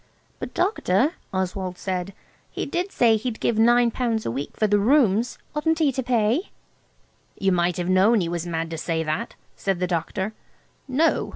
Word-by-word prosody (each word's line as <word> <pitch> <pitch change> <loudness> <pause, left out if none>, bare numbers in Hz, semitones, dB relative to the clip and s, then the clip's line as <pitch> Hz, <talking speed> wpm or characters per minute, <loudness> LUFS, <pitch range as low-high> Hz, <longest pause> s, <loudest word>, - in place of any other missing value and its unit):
"But, - - -7
Doctor," 305 - +2 0.2
Oswald 185 -1 -3
said, 185 0 -3 0.3
"he - - -4
did 365 +3 -2
say 225 -2 +4
he'd 220 +1 -4
give 225 -2 0
nine 240 +1 +5
pounds 230 -2 -1
a - - -1
week 135 +4 -5
for 215 - +2
the 205 0 +3
rooms. 235 -1 +3 0.2
Oughtn't 320 +2 +1
he 310 -4 +3
to 260 0 -2
pay?" 240 - +1 0.9
"You 195 -1 +1
might 175 -1 +1
have 175 -1 -2
known 195 +5 +4
he 175 - -1
was 170 0 -3
mad 165 -1 -3
to 165 - -4
say 160 0 -1
that," 155 0 -3 0.2
said 195 -3 -1
the 180 - +1
doctor. 180 +4 -2 0.5
"No. 290 +5 +1
205 Hz, 180 wpm, -24 LUFS, 180-245 Hz, 0.9 s, nine